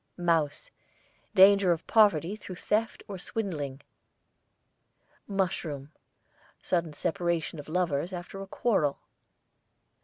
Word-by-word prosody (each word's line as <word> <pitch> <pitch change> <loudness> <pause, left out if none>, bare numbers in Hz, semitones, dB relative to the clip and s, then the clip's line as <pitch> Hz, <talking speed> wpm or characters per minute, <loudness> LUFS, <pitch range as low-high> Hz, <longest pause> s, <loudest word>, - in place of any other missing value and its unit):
MOUSE, 165 -5 0 0.6
danger 195 -1 +7
of 165 -1 -1
poverty 205 -4 +4
through 190 -3 -9
theft 215 +5 -1
or 195 -2 -6
swindling. 150 -11 -4 1.5
MUSHROOM, 165 -8 -2 0.7
sudden 170 -3 -1
separation 170 0 -1
of 145 - -9
lovers 170 -1 0
after 180 +2 -7
a 195 - -7
quarrel. 190 -10 +1
175 Hz, 95 wpm, -29 LUFS, 155-195 Hz, 1.5 s, danger